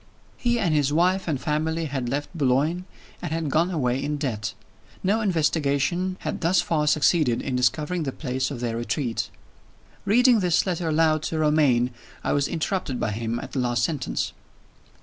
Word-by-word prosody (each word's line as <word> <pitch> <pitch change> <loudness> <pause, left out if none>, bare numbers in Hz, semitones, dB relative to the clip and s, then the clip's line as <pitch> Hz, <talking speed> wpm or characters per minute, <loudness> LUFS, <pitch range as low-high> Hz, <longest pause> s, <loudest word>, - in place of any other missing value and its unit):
He 240 -1 +1
and 180 -8 +1
his 145 -2 +2
wife 180 +5 +2
and 150 -5 0
family 160 +3 -1
had 135 -4 -3
left 145 +7 -3
Boulogne, 150 +5 +1 0.4
and - - -4
had 160 -3 -1
gone 165 +5 +3
away 135 -6 0
in 150 +1 -1
debt. 110 -8 -3 0.5
No 210 +4 +2
investigation 170 0 +1
had - - -4
thus 175 +2 +3
far 150 -2 0
succeeded 150 -4 +3
in 130 - -3
discovering 150 +8 +1
the 140 -4 -2
place 130 -2 -2
of 135 -5 -6
their 115 -2 -2
retreat. 120 0 -2 0.7
Reading 240 +3 +5
this 180 -3 +2
letter 175 -3 -1
aloud 155 0 +3
to 160 - -2
Romayne, 145 -6 +3 0.3
I - - 0
was 140 -1 +2
interrupted 160 -5 -2
by 110 - -1
him 115 +2 -2
at - - -8
the 135 - -2
last 120 -1 +1
sentence. 145 -1 -1
150 Hz, 170 wpm, -25 LUFS, 130-170 Hz, 0.7 s, Reading